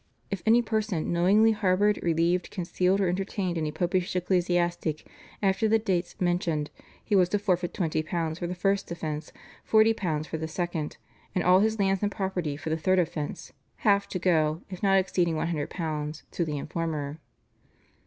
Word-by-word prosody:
If 195 -3 -2
any 235 +2 +6
person 215 -8 -1
knowingly 200 +6 +5
harboured, 205 -1 +2
relieved, 170 +2 +1
concealed, 185 +1 0
or 195 - +2
entertained 185 0 -2
any 155 -2 -1
popish 180 +3 -1
ecclesiastic 175 -3 0 0.4
after 195 +2 +2
the 220 +1 +4
dates 185 -5 -2
mentioned 175 -4 0 0.3
he 210 - +1
was 180 -2 +4
to 205 - +1
forfeit 180 -4 0
£20 160 -1 -2
for 175 - -2
the 180 - -4
first 195 +2 0
offence, 155 -3 -4 0.4
£40 215 -9 +3
for 160 - -4
the 160 - -3
second, 165 -2 -3 0.4
and 180 - +1
all 180 +1 +6
his 220 +2 +2
lands 195 -2 +1
and 205 -1 0
property 185 -8 -2
for 155 +1 -5
the 160 - +1
third 185 +4 +2
offence, 155 -4 -2 0.3
half 200 -1 +4
to - - -3
go 160 -2 +1
(if 185 - -7
not 195 -1 +4
exceeding 180 -3 +1
£100) 155 -1 -3
to 170 - -1
the 150 -2 -3
informer. 155 0 -3
180 Hz, 165 wpm, -27 LUFS, 160-195 Hz, 0.4 s, any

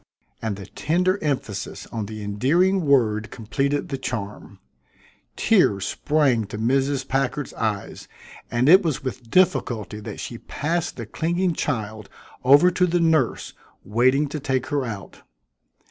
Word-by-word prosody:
and 110 -3 -2
the 100 0 -9
tender 180 +4 0
emphasis 130 -9 -3
on 110 -3 -4
the 110 0 -7
endearing 160 - +2
word 110 -6 +2
completed 140 +5 -2
the 135 -2 -3
charm. 105 -5 -5 0.8
Tears 100 -1 +3
sprang 140 -7 +1
to 105 - -7
Mrs. 135 +4 0
Packard's 135 +1 -1
eyes, 105 -3 -3 0.4
and 120 +2 +1
it 185 +5 +8
was 160 -9 -2
with 130 -3 -6
difficulty 115 - +1
that 105 - -8
she - - -6
passed 165 +3 -2
the 115 - -5
clinging 175 - -1
child 110 -8 -3 0.3
over 145 +8 +6
to 180 0 +2
the 175 +1 +1
nurse 160 -7 +1 0.3
waiting 130 +7 +2
to 150 - -4
take 130 -2 -1
her 145 -2 +1
out. 105 -5 -8
130 Hz, 140 wpm, -23 LUFS, 110-155 Hz, 0.8 s, it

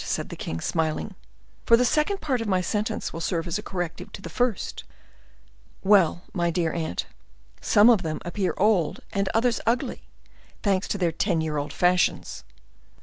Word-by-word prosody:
said - - -2
the - - -6
king, 80 - -4
smiling; 160 - -1 0.5
"for 230 - +6
the 250 - +3
second 305 - +1
part 260 -6 0
of 225 - -3
my 190 -2 +2
sentence 210 +4 -2
will 165 - -5
serve 165 0 -1
as 175 +4 -2
a - - -5
corrective 180 -5 -5
to - - -8
the 170 - -8
first. 245 0 -1 1.0
Well, 190 -3 +4
my 175 -2 +1
dear 165 -2 0
aunt, 160 - -2 0.6
some 210 +2 +5
of 230 -6 +6
them 155 -3 -3
appear 185 +2 -1
old 195 -6 +2
and 195 -1 0
others 230 +1 +2
ugly, 235 +1 0 0.6
thanks 195 -2 +1
to - - -2
their 175 -3 +1
ten 170 +1 0
year 155 -1 -2
old 145 0 -3
fashions." 180 +2 +1
185 Hz, 175 wpm, -25 LUFS, 165-215 Hz, 1.0 s, for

